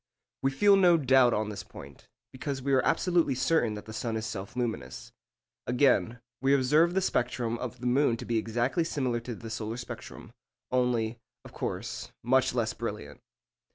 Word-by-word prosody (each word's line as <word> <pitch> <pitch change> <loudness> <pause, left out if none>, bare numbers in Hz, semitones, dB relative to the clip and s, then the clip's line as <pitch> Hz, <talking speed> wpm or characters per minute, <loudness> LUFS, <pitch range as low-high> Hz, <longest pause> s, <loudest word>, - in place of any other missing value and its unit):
We 135 - +2
feel 200 +9 +5
no 175 -3 +6
doubt 130 -4 +5
on 110 -1 -1
this 100 -2 -5
point, 70 -7 -13 0.2
because 135 +1 -4
we 140 0 0
are 130 - +4
absolutely 170 -7 +2
certain 125 -5 +1
that 105 0 -8
the 110 - -9
sun 115 0 -2
is 110 - -4
self 100 -1 -6
luminous. 110 - -4 0.6
Again, 125 -2 +2 0.2
we 135 +1 +4
observe 150 +7 +3
the 190 - +3
spectrum 120 -8 -1
of 125 -1 -6
the - - -6
moon 125 -1 +3
to - - -7
be 115 -1 +1
exactly 120 +9 0
similar 130 -7 -1
to 115 0 -6
the 115 +1 -9
solar 110 0 -4
spectrum, 125 - -9 0.4
only, 120 -3 0 0.3
of - - -12
course, - - -4
much 130 +1 +2
less 115 -1 0
brilliant. 105 -12 -6
125 Hz, 175 wpm, -29 LUFS, 115-135 Hz, 0.6 s, no